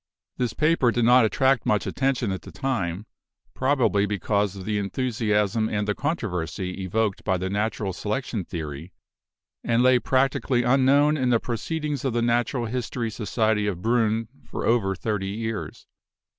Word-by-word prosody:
This 120 -3 -1
paper 155 -4 +3
did 120 -1 +1
not 125 0 +6
attract 130 +2 +2
much 105 -1 +1
attention 130 -5 0
at 95 - -4
the - - -11
time, 105 -8 -2 0.5
probably 130 -7 +2
be 105 0 -1
cause 100 0 0
of 95 -1 -8
the 105 0 0
enthusiasm 110 0 0
and 105 -1 -1
the 105 - +1
controversy 95 - -3
evoked 105 +2 -1
by 95 -3 +1
the 95 +1 -3
natural 105 -1 -1
selection 110 +1 -3
theory, 80 0 -7 0.7
and 120 +1 +2
lay 130 -1 +5
practically 130 -1 +1
unknown 140 +4 +4
in 130 -3 +1
the 120 -2 +4
Proceedings 145 +5 -3
of 135 -4 -1
the 120 0 +1
Natural 120 +1 +1
History 120 0 -3
Society 110 -1 0
of 100 -4 -1
Briinn 115 -1 +1 0.2
for - - -5
over 100 -5 +2
thirty 100 0 -2
years. 110 +1 -5
115 Hz, 155 wpm, -25 LUFS, 100-125 Hz, 0.7 s, not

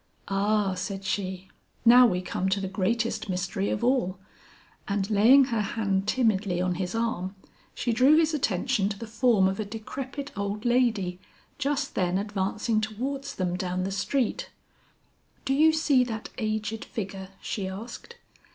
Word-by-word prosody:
"Ah," 200 0 +1
said 195 +1 -4
she, 190 -1 -3 0.4
"now 245 +1 +8
we 180 -5 0
come 185 +1 -1
to 195 +1 +1
the 195 - -3
greatest 220 +3 -1
mystery 185 +2 -1
of 205 - -2
all." 240 -7 +1 0.7
And 200 -1 -1
laying 235 +7 +7
her 220 - +1
hand 200 -2 -1
timidly 210 -6 +1
on 180 0 +1
his 180 +3 -3
arm, 210 -5 -2 0.4
she 240 - -1
drew 265 +6 +5
his 320 -1 +3
attention 225 -5 0
to 200 - -5
the 230 - -6
form 220 -3 +3
of 190 +2 -2
a - - 0
decrepit 260 +7 -6
old 200 +2 -3
lady 230 -7 +1 0.4
just 285 0 -1
then 180 -1 +1
advancing 210 +2 -1
towards 265 +6 -4
them 180 -2 -1
down 185 0 -2
the 195 - -2
street 240 +5 -1 1.0
"Do 270 - +1
you 310 +3 +5
see 300 -5 +3
that 225 -3 -5
aged 215 0 -2
figure?" 195 -4 -6
she 195 -3 -3
asked. 230 - -8
210 Hz, 155 wpm, -27 LUFS, 190-245 Hz, 1.0 s, now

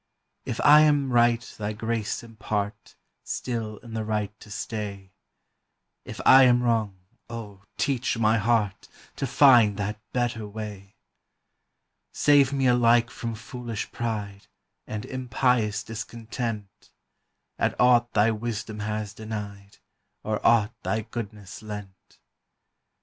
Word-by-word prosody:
If - - -4
I 150 +1 +8
am 145 -3 +3
right 120 0 +4 0.2
thy 105 0 -2
grace 110 0 -3
impart 105 -2 -4 0.3
Still 115 -4 -4
in 115 -2 -10
the 110 -1 -2
right 105 -1 -2
to - - -14
stay; 100 -2 -5 0.9
If - - -8
I 135 +1 +9
am 125 -1 +4
wrong, 110 -5 +1 0.3
O, 105 -4 -8 0.2
teach 130 -3 0
my 110 0 +3
heart 105 -2 0 0.3
To 135 - -2
find 120 -7 +6
that 105 +1 -3
better 120 -3 -1
way! 105 -1 -8 1.2
Save 145 -2 +4
me 135 -1 0
alike 120 -1 +4
from 115 -1 -5
foolish 115 0 -6
pride 105 -4 -4 0.4
And 105 0 -5
impious 125 -4 0
discontent 115 -1 -6 0.7
At - - 0
aught 120 -1 +4
thy 105 +2 +4
wisdom 110 -1 -4
has 105 0 -3
dented, 105 -2 -7 0.5
Or 105 0 -2
aught 115 -1 +4
thy 110 - -1
goodness 105 -4 -7
lent. 105 -3 -10
110 Hz, 120 wpm, -26 LUFS, 105-120 Hz, 1.2 s, I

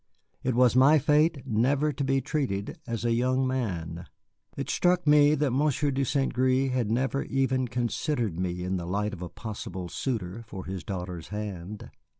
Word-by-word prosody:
It 130 -2 0
was 125 -1 +4
my 135 +4 +7
fate 150 0 +2
never 135 +6 +1
to 140 +2 -3
be 135 0 +1
treated 130 -8 -2
as 115 0 -3
a 120 - +2
young 130 +2 +1
man. 90 -10 -3 0.5
It - - -3
struck 180 -1 +2
me 150 0 +6
that 145 -2 +1
Monsieur 145 +2 +1
de 135 +1 0
St. 135 +1 0
Gré 130 +1 +2
had 125 -4 0
never 130 +4 0
even 130 -1 0
considered 120 - -1
me 90 -1 -2
in 95 +1 -1
the 85 -1 -5
light 105 +3 -1
of 90 - -8
a 90 - -5
possible 95 -5 -6
suitor 110 -2 -3
for 95 -3 -7
his 95 -1 -5
daughter's 90 -3 -5
hand. 105 -1 -6
125 Hz, 175 wpm, -27 LUFS, 95-135 Hz, 0.5 s, my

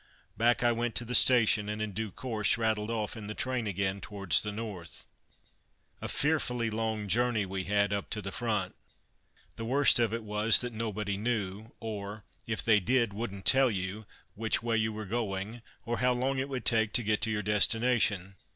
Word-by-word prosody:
Back 120 +2 +2
I 120 - +4
went 120 0 -2
to 120 - 0
the 125 - -5
station, 115 -5 +5
and 105 0 -4
in 110 -1 -3
due 110 +2 -4
course 110 +1 -1
rattled 110 -2 -1
off 110 -2 -3
in 110 -2 -8
the 105 - -6
train 130 -4 -2
again 95 0 -2
towards 100 -7 +1
the 105 - -4
North. 100 -6 -7 1.0
A - - -4
fearfully 125 -6 0
long 110 -1 -2
journey 120 0 +2
we 95 -1 -4
had, 100 0 +1
up 100 - -3
to 105 - -2
the 100 - -4
Front! 105 -6 -2 0.8
The 115 - -5
worst 140 +2 +5
of 115 -3 +2
it 115 0 -4
was 105 +1 +4
that 125 -1 -4
nobody 105 -3 -3
knew 105 -1 -3
or, 105 -2 -6 0.2
if 110 -1 -1
they 110 -2 +4
did, 115 +1 +1
wouldn't 100 -3 -6
tell 135 0 +5
you 100 +1 -4 0.3
which 110 +1 -1
way 115 -1 0
you 110 0 0
were 110 0 -6
going, 105 +1 -4 0.2
or 120 0 -2
how 125 0 +3
long 130 +2 -1
it 135 +1 -3
would 130 -5 -5
take 110 -2 +2
to 120 - +3
get 105 0 0
to 110 - +1
your 105 -1 -1
destination. 105 -2 +2
110 Hz, 195 wpm, -29 LUFS, 105-120 Hz, 1.0 s, station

